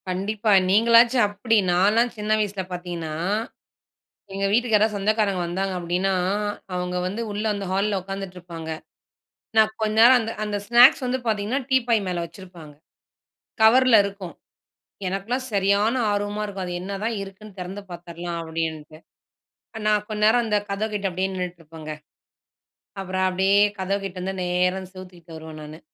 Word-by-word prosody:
கண்டிப்பா. 205 +4 -1 0.2
நீங்களாச்சும் 230 +3 +5
அப்டி. 215 +3 0
நான்லாம் 210 +7 +3
சின்ன 210 0 -5
வயசுல 205 -2 -2
பாத்தீங்கனா, 175 -3 -5 1.2
எங்க 195 0 -1
வீட்டுக்கு 230 +1 +2
யாராவது 210 0 +1
சொந்தக்காரங்க 200 -2 +1
வந்தாங்க 190 +3 -2
அப்படின்னா, 180 +3 0 0.6
அவங்க 180 0 -2
வந்து 205 +5 -4
உள்ள 205 +1 -3
அந்த 200 -1 -4
ஹால்ல 200 +1 0
உட்காந்துட்ருப்பாங்க. 180 -4 -7 0.9
நான் 220 0 +5
கொஞ்ச 215 0 0
நேரம் 250 +2 +8
அந்த 225 0 -4
அந்த 210 -1 -2
ஸ்நாக்ஸ் 240 +3 +6
வந்து 255 +1 -1
பாத்திங்கன்னா 220 +4 0
டீப்பாய் 240 -4 +3
மேல 175 -1 -2
வச்சிருப்பாங்க. 170 -3 -12 0.9
கவர்ல 250 +2 +6
இருக்கும். 200 -3 -6 0.7
எனக்கெல்லாம் 225 +8 -3
சரியான 200 +3 +2 0.2
ஆர்வமா 205 +1 -2
இருக்கும், 195 -2 -5
அது 180 - -5
என்னதான் 200 +4 -3
இருக்குன்னு 195 +1 -11
திறந்து 185 +3 -6
பாத்துற்லாம் 170 0 -6
அப்டின்டு. 160 -1 -5 0.8
ஆ, - - -5
நான் 210 -1 +2
கொண் 210 -1 -4
நேரம் 230 +3 +4
அந்த 210 -2 +1
கதவ் 210 +2 -2
கிட்ட 200 -1 -1
அப்படியே 185 +2 -2
நின்னுட்டுருப்பங்க. 165 -4 -7 1.1
அப்பறம் 185 0 -1
அப்படியே 190 +2 +2 0.2
கதவு 195 +1 -1
கிட்டந்து 185 0 -4
நேரா 180 +1 +1
அந்த 185 0 -11
செவ்த்துக்கிட்ட 180 -3 -12
வருவேன் 160 -1 -10
நானு. 155 +1 -10
195 Hz, 140 wpm, -23 LUFS, 180-215 Hz, 1.2 s, நேரம்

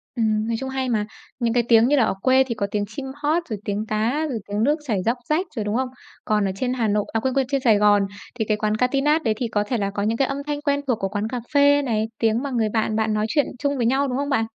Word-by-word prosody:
Ừm, 220 -2 +1
nói 230 - 0
chung 265 0 -4
hay 265 -1 -2
mà. 215 -3 0 0.3
Những 235 -2 +1
cái 240 0 +3
tiếng 230 0 +6
như 290 - +3
là 265 - +4
ở - - +1
quê 260 +2 +5
thì 235 - -3
có 200 -2 -2
tiếng 205 -1 -1
chim 240 +6 -7
hót, 305 +4 0
rồi 215 -3 -3
tiếng 205 +1 -2
cá, 230 +9 0
rồi 240 -5 -3
tiếng 205 +1 -1
nước 295 +5 +2
chảy 210 -8 -1
róc 235 +3 +1
rách 335 +5 +1
rồi, 220 -3 -2
đúng 210 +1 -1
không? 260 +1 0 0.4
Còn 210 -1 +1
ở 195 - 0
trên 250 +5 -1
Hà 235 -4 0
Nội, 210 0 +1
à, 225 - +2
quên 260 +3 -1
quên 270 -1 +1
trên 275 -2 0
Sài 225 -5 +4
Gòn 205 0 +4 0.3
thì 225 -3 -1
cái 215 0 0
quán 210 0 0
Katinat 275 +6 +2
đấy 220 - +2
thì 245 - -1
có 210 -2 0
thể 240 +4 -2
là 200 -2 -1
có 200 0 -3
những 225 +2 0
cái 270 - +2
âm 275 - -3
thanh 290 -1 -2
quen 285 -1 0
thuộc 245 -4 +1
của 195 - -1
quán 205 +2 -2
cà 250 +2 -3
phê 285 0 +5
này, 220 -5 -1
tiếng 225 +2 +1
mà 280 - -3
người 230 -4 +1
bạn 220 0 0
bạn 220 0 +1
nói 215 0 0
chuyện 290 +5 +2
chung 285 0 0
với 240 - 0
nhau, 270 +4 +2
đúng 250 -1 -2
không 285 +1 -2
bạn? 225 -6 +1
235 Hz, 305 wpm, -23 LUFS, 215-270 Hz, 0.4 s, tiếng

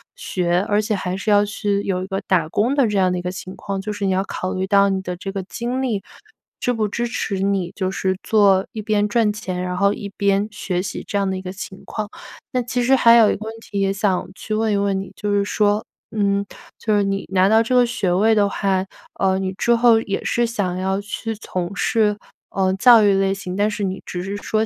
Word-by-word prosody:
学， 175 -1 0
而 205 0 +3
且 215 0 -1
还 185 -1 -2
是 210 +2 -1
要 205 0 +5
去 205 0 -1
有 185 -2 -2
一 - - -6
个 195 0 -3
打 170 -5 +2
工 235 +10 +1
的 275 -5 +3
这 205 -1 -1
样 185 -1 +3
的 180 - -1
一 - - -3
个 180 - -2
情 185 0 -8
况。 195 -1 -4
就 210 +1 -4
是 205 -1 -3
你 190 - +1
要 190 +1 +1
考 185 -1 -4
虑 190 +1 -2
到 200 -1 +4
你 190 -1 -1
的 180 -1 -5
这 195 +2 -6
个 195 -1 -3
精 240 +6 -3
力， 215 -7 -1 0.6
支 245 - 0
不 215 -2 0
支 235 +4 -2
持 200 -4 -3
你， 195 -2 0
就 185 -1 -1
是 190 -1 -1
做 200 -3 +4
一 215 - -5
边 210 -1 +1
赚 220 -1 +2
钱， 185 -4 -4
然 180 0 -3
后 200 +1 +3
一 205 -3 -6
边 200 0 +2
学 185 -3 -2
习 200 - -5
这 - - -5
样 195 -1 +1
的 190 - -2
一 - - -6
个 185 - -6
情 190 -1 -9
况。 215 -1 -4 0.4
那 250 - 0
其 245 +1 -1
实 265 +2 +4
还 235 -3 +6
有 225 -3 +6
一 - - 0
个 215 - -8
问 220 - -5
题 205 -3 -5
也 195 0 +2
想 195 -2 0
去 215 - -5
问 220 -1 +1
一 - - +2
问 200 -1 0
你， 195 - -8
就 210 -1 -3
是 200 0 +2
说， 210 +1 +1 0.3
嗯， 200 -1 +1 0.3
就 215 -2 +1
是 200 - +3
你 195 0 -2
拿 190 0 +4
到 220 +2 +5
这 250 +3 0
个 245 -1 +6
学 235 -7 -1
位 215 +5 +3
的 205 -1 +3
话， 195 -1 0 0.3
呃， 190 -1 +2
你 190 0 -2
之 235 +5 +2
后 230 -1 +5
也 195 -3 -3
是 240 0 +1
想 200 -6 -2
要 190 +1 0
去 215 +2 -5
从 185 -2 -4
事， 215 -3 +1 0.3
呃， 190 -1 +1
教 230 +2 +7
育 200 - +5
类 195 0 +2
型， 185 -1 -6
但 205 +1 +2
是 210 -1 -4
你 190 0 -3
只 180 0 -5
是 200 +1 -4
说 215 +1 0
200 Hz, 270 characters per minute, -21 LUFS, 190-215 Hz, 0.6 s, 教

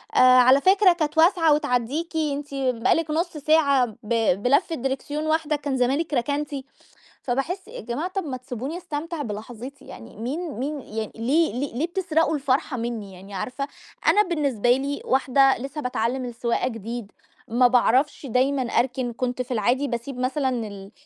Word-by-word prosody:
"آآ، - - +4
على 255 +1 +7
فكرة 380 +2 +5
كانت 310 -3 -2
واسعة 330 -1 +5
وتعدّيكِ 290 +3 -1
أنتِ 290 -2 -2
بقى 255 -3 +1
لِك 325 -1 -1
نُص 330 +1 -1
ساعة 285 -3 +3 0.2
ب 225 -3 +2
بلفّة 285 +7 +2
دريكسيون 275 +3 -3
واحدة 310 -1 +1
كان 285 -2 -2
زمانِك 275 +6 0
ركنتِ"، 285 +4 -1 0.7
فباحس 275 +10 -2
يا - - -8
جماعة 240 - -3
طَب 385 0 -3
ما 265 -4 -4
تسيبوني 255 +4 -5
استمتع 330 -2 -5
بلحظتي 235 +3 -7
يعني، 110 - -11
مين 295 +10 -4
مين 285 +2 -3
يعني 220 -2 -5
ليه 275 +6 +1
ل 250 0 -4
ليه 310 +6 0
بتسرقوا 330 -3 +1
الفرحة 270 -2 0
منّي 225 -4 -4
يعني؟! 190 +2 -12
عارفة، 255 +8 -4 0.4
أنا 420 - +6
بالنسبة 280 - +1
لي 275 +3 0
واحدة 270 +1 +3
لسه 275 +4 -6
باتعلم 250 0 -1
السواقة 235 0 -1
جديد، 230 -2 -6 0.4
ما 245 +2 +4
باعرفش 255 +4 +2
دايمًا 265 +2 +1
أركن، 245 0 0
كنت 250 +1 -2
في 250 +1 -7
العادي 245 +5 +1
باسيب 245 +1 -4
مثلًا 265 +2 0 0.2
ال 200 -1 -10
270 Hz, 160 wpm, -24 LUFS, 245-300 Hz, 0.7 s, على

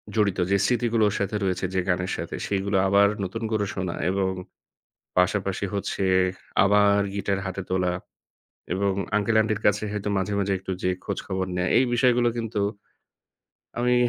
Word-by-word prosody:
জড়িত, 100 -4 +2
যে 100 - +5
স্মৃতিগুলো 120 -1 +2
ওর 105 - -4
সাথে 100 +1 -1
রয়েছে 95 -1 0
যে 95 - +1
গানের 90 +1 0
সাথে - - -5
সেগুলো 100 0 0
আবার 100 +1 +5 0.2
নতুন 105 +5 -4
করে 105 -2 +1
শোনা। 90 -3 -3
এবং 95 0 0 0.9
পাশাপাশি 95 +1 +1
হচ্ছে 100 0 -2 0.6
আবার 100 0 +4
guitar 100 -1 -1
হাতে 95 0 -4
তোলা। 90 -1 +1 0.8
এবং 100 +1 +1 0.3
uncle-aunty'র 110 0 +2
কাছে 105 +1 +3
হয়তো 105 -1 -3
মাঝেমাঝে 100 +1 0
একটু 95 0 -6
যেয়ে 90 0 0
খোঁজখবর 95 0 -3
নেয়া। 90 0 0
এই 125 - +5
বিষয়গুলো 120 -1 +3
কিন্তু 115 -2 -2 1.2
আমি 125 +1 +2
100 Hz, 145 wpm, -25 LUFS, 95-105 Hz, 1.2 s, যে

